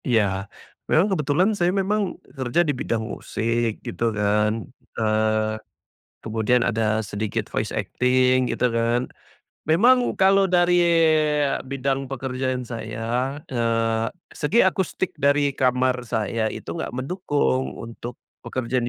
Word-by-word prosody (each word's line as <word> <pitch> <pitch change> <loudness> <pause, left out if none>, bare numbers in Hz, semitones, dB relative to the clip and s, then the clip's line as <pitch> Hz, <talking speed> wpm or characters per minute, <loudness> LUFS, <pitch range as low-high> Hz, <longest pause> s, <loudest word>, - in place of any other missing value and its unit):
Iya. 100 -5 +1 0.4
Memang 165 +6 +4
kebetulan 155 +4 +2
saya 175 -2 +2
memang, 200 +1 0
eee, - - -21
kerja 130 +4 +1
di 145 - +2
bidang 115 -3 -2
musik 115 0 -2
gitu 115 -1 -1
kan, 105 +2 +1 0.3
eee, 110 0 +1 0.7
kemudian 115 +2 +1
ada 110 -1 +1
sedikit 100 +1 -3
voice - - -1
acting 130 0 +2
gitu 125 - +1
kan. 115 +2 +1 0.6
Memang 245 +10 +4
kalau 195 0 +4
dari 175 0 +4 0.9
bidang 135 0 -2
pekerjaan 130 -1 -3
saya, 115 +4 -3 0.2
eee, 115 -1 +1 0.3
segi 190 +10 +2
akustik 190 -1 -1
dari 140 0 +3
kamar 125 -1 +1
saya 110 -1 -1
itu - - -7
nggak 165 - -4
mendukung, 145 -3 -1
untuk 115 +1 -8 0.2
pekerjaan 130 0 -2
125 Hz, 120 wpm, -23 LUFS, 115-145 Hz, 0.9 s, Memang